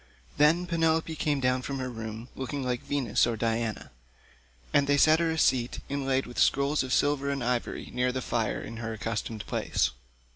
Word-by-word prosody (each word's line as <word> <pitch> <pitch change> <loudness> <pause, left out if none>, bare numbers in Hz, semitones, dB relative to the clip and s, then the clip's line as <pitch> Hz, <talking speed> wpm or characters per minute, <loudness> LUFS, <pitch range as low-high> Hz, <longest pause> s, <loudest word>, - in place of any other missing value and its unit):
Then 160 +4 +4
Penelope 165 -2 +1
came 145 -2 0
down 125 -1 +1
from 135 +1 -4
her 130 -1 -3
room 115 0 -6
looking 135 +1 -4
like 125 -1 -1
Venus 130 -6 +1
or 115 -1 -1
Diana, 115 0 -2 0.8
and 145 -1 +4
they 145 0 +3
set 155 +2 +6
her 170 -1 +1
a 160 - -1
seat 125 -5 +2
inlaid 135 -1 0
with 120 - -6
scrolls 140 +2 +3
of 130 -1 -4
silver 140 +1 +2
and 140 -2 -2
ivory 120 0 -2
near 125 0 +1
the 130 - -2
fire 120 -3 -1
in 115 - -7
her 115 0 -4
accustomed 110 0 -4
place. 65 - 0
130 Hz, 185 wpm, -28 LUFS, 120-145 Hz, 0.8 s, set